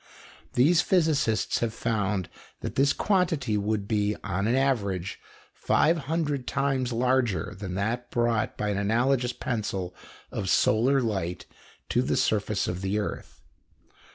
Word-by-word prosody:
These 160 Hz, +7 st, +5 dB
physicists 155 Hz, -, +1 dB
have 115 Hz, -1 st, -2 dB
found 105 Hz, -6 st, -1 dB, 0.3 s
that -, -, -4 dB
this 140 Hz, +1 st, +3 dB
quantity 170 Hz, -, +1 dB
would 105 Hz, 0 st, -1 dB
be, 105 Hz, -1 st, +1 dB
on 100 Hz, +1 st, -1 dB
an 120 Hz, -, +2 dB
average, 100 Hz, -9 st, 0 dB, 0.3 s
five 165 Hz, +2 st, +2 dB
hundred 145 Hz, -3 st, -2 dB
times 135 Hz, -2 st, 0 dB
larger 120 Hz, -7 st, +1 dB
than 95 Hz, -1 st, -5 dB
that 115 Hz, +5 st, -2 dB
brought 120 Hz, -2 st, 0 dB
by 105 Hz, -, -1 dB
an 100 Hz, -1 st, 0 dB
analogous 120 Hz, +4 st, +1 dB
pencil 100 Hz, -8 st, -3 dB, 0.4 s
of 95 Hz, -, -3 dB
solar 130 Hz, +8 st, +3 dB
light 95 Hz, -6 st, -2 dB, 0.4 s
to -, -, +2 dB
the -, -, 0 dB
surface -, -, +1 dB
of 90 Hz, +1 st, -3 dB
the 95 Hz, +2 st, -1 dB
earth. 105 Hz, -, -5 dB
115 Hz, 135 wpm, -27 LUFS, 100-135 Hz, 0.4 s, These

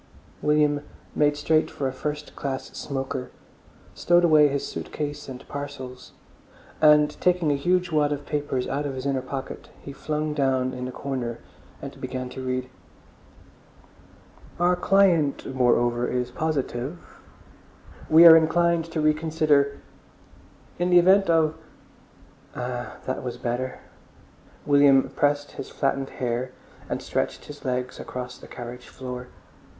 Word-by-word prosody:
William 150 Hz, -1 st, +2 dB, 0.3 s
made 145 Hz, 0 st, +2 dB
straight 155 Hz, +1 st, +2 dB
for 135 Hz, -, -3 dB
a 130 Hz, -, -3 dB
first 150 Hz, +2 st, -5 dB
class 135 Hz, -2 st, -4 dB
smoker, 135 Hz, -2 st, -4 dB, 0.6 s
stowed 175 Hz, 0 st, +3 dB
away 155 Hz, -3 st, +6 dB
his 140 Hz, -1 st, -2 dB
suit -, -, -7 dB
case 145 Hz, -2 st, -5 dB
and 130 Hz, 0 st, -9 dB
parcels, 140 Hz, -3 st, -7 dB, 0.7 s
and 150 Hz, -1 st, +6 dB
taking 180 Hz, -4 st, +2 dB
a -, -, +2 dB
huge 180 Hz, +5 st, +1 dB
wad 150 Hz, -2 st, +2 dB
of 145 Hz, -1 st, -3 dB
papers 145 Hz, -4 st, -2 dB
out 145 Hz, +1 st, -2 dB
of 135 Hz, -, -5 dB
his 130 Hz, +1 st, -6 dB
inner 135 Hz, -2 st, 0 dB
pocket, 135 Hz, +1 st, -7 dB
he 140 Hz, -, -9 dB
flung 150 Hz, +1 st, -2 dB
down 130 Hz, -3 st, +1 dB
in 125 Hz, -, -5 dB
the 130 Hz, -, -5 dB
corner 125 Hz, -4 st, -4 dB, 0.5 s
and -, -, -8 dB
began 130 Hz, -1 st, -4 dB
to 130 Hz, -, -7 dB
read. 130 Hz, 0 st, -2 dB, 1.9 s
"Our 175 Hz, +1 st, +3 dB
client 175 Hz, -6 st, +3 dB
moreover 120 Hz, -1 st, +2 dB
is 125 Hz, 0 st, -2 dB
positive.... 150 Hz, 0 st, -4 dB, 0.9 s
We 165 Hz, +2 st, +8 dB
are 165 Hz, -1 st, +12 dB
inclined 170 Hz, +1 st, +3 dB
to 165 Hz, -1 st, -3 dB
reconsider... 155 Hz, -2 st, +2 dB, 1.0 s
in 175 Hz, +1 st, +1 dB
the 180 Hz, -, +6 dB
event 190 Hz, +2 st, +5 dB
of—" 160 Hz, -2 st, +3 dB, 1.0 s
Ah, 125 Hz, 0 st, -5 dB
that 130 Hz, -, -3 dB
was 125 Hz, -1 st, -5 dB
better. 125 Hz, +1 st, -3 dB, 0.8 s
William 140 Hz, -2 st, +5 dB
pressed 145 Hz, 0 st, +1 dB
back -, -, -17 dB
his -, -, -6 dB
flattened 135 Hz, -1 st, -1 dB
hair 125 Hz, +1 st, -3 dB, 0.4 s
and -, -, -3 dB
stretched -, -, -2 dB
his 145 Hz, 0 st, -11 dB
legs 125 Hz, -1 st, -3 dB
across 125 Hz, 0 st, -7 dB
the -, -, -12 dB
carriage 125 Hz, 0 st, -9 dB
floor. 125 Hz, -1 st, -7 dB
145 Hz, 140 wpm, -25 LUFS, 130-155 Hz, 1.9 s, are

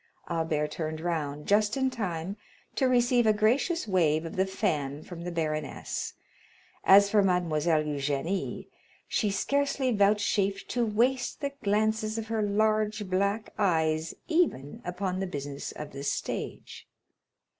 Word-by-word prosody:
Albert 160 Hz, -3 st, 0 dB
turned 155 Hz, 0 st, -4 dB
round, 150 Hz, -4 st, -2 dB
just 210 Hz, +4 st, +2 dB
in 265 Hz, -1 st, +1 dB
time 190 Hz, -6 st, -3 dB, 0.4 s
to 265 Hz, -, +2 dB
receive 245 Hz, -1 st, +3 dB
a 215 Hz, -, +6 dB
gracious 240 Hz, -, +1 dB
wave 165 Hz, -5 st, +2 dB
of 165 Hz, -, -6 dB
the 190 Hz, +1 st, +2 dB
fan 150 Hz, -8 st, -1 dB
from 175 Hz, -2 st, -9 dB
the 175 Hz, +1 st, -4 dB
baroness; 155 Hz, -3 st, -3 dB, 0.7 s
as 200 Hz, +1 st, +7 dB
for 210 Hz, -, +5 dB
Mademoiselle 170 Hz, -4 st, +2 dB
Eugénie, 145 Hz, +5 st, -2 dB, 0.4 s
she 210 Hz, -, +1 dB
scarcely 275 Hz, +5 st, 0 dB
vouchsafed 200 Hz, -1 st, +2 dB
to 245 Hz, -, 0 dB
waste 245 Hz, +4 st, +1 dB
the 280 Hz, -2 st, -2 dB
glances 215 Hz, +1 st, +1 dB
of 225 Hz, 0 st, -4 dB
her 225 Hz, -1 st, 0 dB
large 215 Hz, 0 st, +1 dB
black 200 Hz, +3 st, 0 dB
eyes 160 Hz, -4 st, +1 dB
even 320 Hz, -, 0 dB
upon 185 Hz, +1 st, -3 dB
the 195 Hz, -, -1 dB
business 145 Hz, -4 st, -5 dB
of 150 Hz, -1 st, -7 dB
the 140 Hz, -, -7 dB
stage. 140 Hz, -, -4 dB
195 Hz, 135 wpm, -28 LUFS, 160-215 Hz, 0.7 s, as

